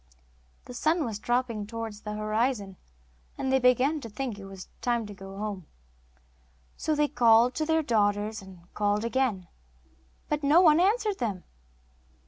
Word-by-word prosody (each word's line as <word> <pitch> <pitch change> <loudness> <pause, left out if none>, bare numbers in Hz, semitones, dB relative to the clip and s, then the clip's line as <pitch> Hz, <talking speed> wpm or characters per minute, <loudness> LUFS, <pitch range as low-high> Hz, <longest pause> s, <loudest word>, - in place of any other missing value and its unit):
The 250 - -9
sun 310 +6 +1
was 220 -3 -4
dropping 240 -3 -1
towards 225 -2 -6
the 210 - -5
horizon, 215 -2 -1 0.6
and 265 - -2
they 265 - +4
began 255 +5 +3
to 230 - -8
think 230 -1 -5
it 195 - -9
was 195 -1 -10
time 240 -2 0
to 205 - -8
go 195 0 -10
home. 200 -5 -5 1.1
So 310 -1 -1
they 295 0 +2
called 240 -1 +4
to 310 +3 -2
their 320 0 +2
daughters 210 -3 0
and 190 -2 -13
called 205 +1 0
again, 230 -7 0 0.8
but 300 0 -1
no 295 +4 +5
one 320 -3 +6
answered 415 +2 +1
them. 205 -7 -3
230 Hz, 155 wpm, -28 LUFS, 205-270 Hz, 1.1 s, one